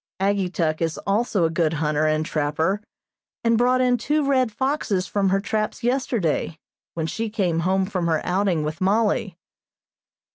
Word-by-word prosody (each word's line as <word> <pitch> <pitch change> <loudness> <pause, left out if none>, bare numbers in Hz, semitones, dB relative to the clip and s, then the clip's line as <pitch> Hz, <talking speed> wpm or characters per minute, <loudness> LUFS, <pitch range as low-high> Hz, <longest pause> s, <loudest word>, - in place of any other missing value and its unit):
Ageetuk 185 -5 0 0.2
also 200 -2 +1
is - - +4
a 160 - -5
good 165 -2 +1
hunter 150 0 0
and 155 0 +1
trapper, 160 +7 0 0.6
and 230 0 +3
brought 250 +2 +3
in 250 -1 +2
two 300 +5 0
red 260 -4 +2
foxes 225 -6 -1
from 200 -1 0
her 195 +1 +2
traps 215 +2 -2
yesterday, 235 - 0 0.4
when 165 -1 -2
she 225 +7 -3
came 180 -6 0
home 190 +3 +1
from 185 -3 -2
her 160 -2 +2
outing 180 -3 +1
with 155 +4 -4
Mollie. 200 -2 +1
195 Hz, 155 wpm, -23 LUFS, 165-225 Hz, 0.6 s, is